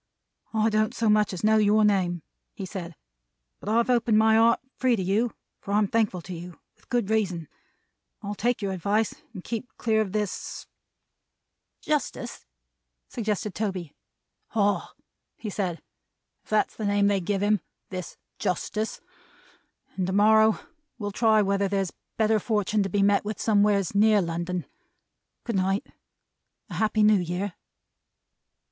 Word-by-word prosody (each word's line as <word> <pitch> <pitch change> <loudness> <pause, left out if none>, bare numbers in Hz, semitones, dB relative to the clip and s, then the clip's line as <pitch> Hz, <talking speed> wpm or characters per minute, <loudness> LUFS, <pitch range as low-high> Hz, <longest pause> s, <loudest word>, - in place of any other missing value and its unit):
"I 220 +1 +3
don't 215 0 +1
so 225 -1 +1
much 210 -1 +3
as 185 0 -6
know 220 +1 +5
your 215 0 +4
name," 180 -5 +1 0.3
he 195 - -5
said, 180 -3 -7 0.6
"but - - -6
I've 230 +2 +3
opened 235 -3 +3
my 220 0 +5
heart 230 +1 +5 0.2
free 255 -2 +2
to 190 - -2
you, 215 +6 +1 0.3
for 200 - -5
I'm 210 -1 +3
thankful 205 -5 0
to 185 - -7
you; 175 0 -9 0.2
with - - -30
good 240 -4 0
reason. 185 -7 0 0.8
I'll 205 0 -3
take 235 +1 -1
your 195 - -1
advice 200 +4 0 0.2
and 190 -6 -9
keep 235 +2 -4
clear 220 -2 +2
of 205 -3 -2
this 210 -1 -3 0.6
" - - -55
"Justice," 300 - -2 0.6
suggested 210 -3 -2
Toby. 190 -7 -3 0.6
"Ah!" 205 -2 +1 0.5
he 215 - -5
said. 185 -4 -3 0.6
"If - - -27
that's 215 0 +1
the 215 - -4
name 205 0 +3
they 200 -1 +2
give 195 +2 -1
him. 210 -2 +2 0.3
This 185 -2 -6 0.2
Justice. 215 +4 -2 1.0
And 185 -1 0
to 190 - -2
morrow 220 +2 +5 0.4
will 205 -3 -4
try 215 0 +4
whether 200 0 +1
there's 195 -2 -1 0.2
better 220 -1 +3
fortun' 210 -1 0
to 195 - -1
be 200 +2 +2
met 200 0 +3
with 210 +1 -4
somewheres 205 -3 +2
near 210 +1 +5
London. 175 0 -2 0.8
Goodnight. 195 -3 0 0.9
A - - -5
Happy 215 0 +2
New 210 -1 +6
Year!" 180 +2 -3
205 Hz, 150 wpm, -26 LUFS, 190-220 Hz, 1.0 s, New